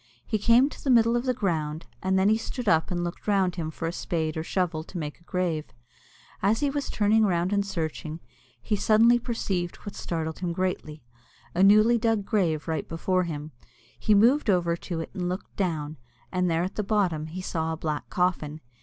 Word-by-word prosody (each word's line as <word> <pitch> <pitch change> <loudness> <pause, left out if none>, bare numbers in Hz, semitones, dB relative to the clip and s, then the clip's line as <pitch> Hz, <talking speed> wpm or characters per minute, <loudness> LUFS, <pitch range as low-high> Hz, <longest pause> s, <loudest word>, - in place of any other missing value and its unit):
He 215 - -1
came 235 +5 +5
to - - -12
the 275 - -1
middle 230 -1 +5
of 240 +1 0
the 255 - +2
ground, 160 -7 -2 0.2
and 190 0 +1
then 200 +3 +4
stood 225 +2 -5
up 160 -4 +3
and 175 -1 -1
looked 175 +4 -6
round 195 -3 +2
him 165 -3 -3
for 165 +1 -4
a - - -1
spade 160 -3 -2
or 160 - -2
shovel 170 -2 -1
to 180 - -9
make 150 -1 -5
a - - -24
grave. 175 -5 -1 0.8
As 210 +6 +2
he 285 -1 +1
was 285 0 -3
turning 220 +1 +3
round 180 -1 +1
and 200 0 +2
searching, 160 -4 -4 0.4
he 125 - -1
suddenly 225 +4 +5
perceived 195 -7 -2
what 205 - -6
startled 160 -2 -4
him 175 -2 -2
greatly 170 -5 -3 0.5
a 175 - +1
newly 215 +4 +6
dug 225 -3 +1
grave 175 -9 0
right 160 -3 -2
before 180 +2 0
him. 155 -2 -5 0.5
He 215 - +3
moved 235 +6 +4
over 175 -3 +2
to 170 -1 -5
it, - - -7
and 180 -3 -2
looked 185 +2 -6
down, 155 -5 -2 0.3
and 180 -1 +1
there 165 +1 +1
at 185 - -5
the 210 - 0
bottom 185 -7 0
he 175 +4 -6
saw 160 -3 -2
a 160 - -3
black 155 -2 -3
coffin. 170 -4 0
180 Hz, 205 wpm, -26 LUFS, 160-210 Hz, 0.8 s, newly